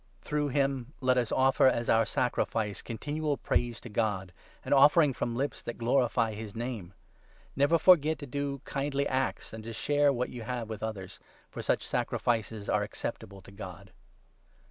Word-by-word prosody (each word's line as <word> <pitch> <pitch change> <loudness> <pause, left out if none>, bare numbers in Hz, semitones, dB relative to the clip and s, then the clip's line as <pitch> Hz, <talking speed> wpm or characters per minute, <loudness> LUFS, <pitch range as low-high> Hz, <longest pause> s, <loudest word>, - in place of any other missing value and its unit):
Through 150 -1 0
him 135 -1 -1
let 130 -1 +3
us 120 -2 -2
offer, 130 0 +4
as 120 -2 +1
our 115 -1 +4
sacrifice, 110 -4 -1
i< - - -20
continual 145 +5 -2
praise 120 -1 0
to - - -9
God 105 -4 -1 0.2
— - - -28
an - - +1
offering 145 +1 +6
from 120 -1 -2
lips 140 +4 -2
that 120 - -6
glorify 115 -2 +2
his 105 0 -7
Name. 115 -6 -5 0.6
Never 145 +4 +4
forget 160 -3 +5
to 145 - -7
do 140 0 -3
kindly 140 0 -1
acts 130 -3 -2
and 110 -1 -7
to 115 +1 -6
share 145 +5 +2
what 125 -1 -1
you 120 - -7
i( - - -7
have 120 -3 -4
with 110 - -6
others, 100 -4 -5 0.3
for - - -6
such - - 0
sacrifices 110 -3 -1
are - - +2
acceptable 100 -1 -6
to - - -14
God. 100 - -9
125 Hz, 180 wpm, -30 LUFS, 110-140 Hz, 0.6 s, offering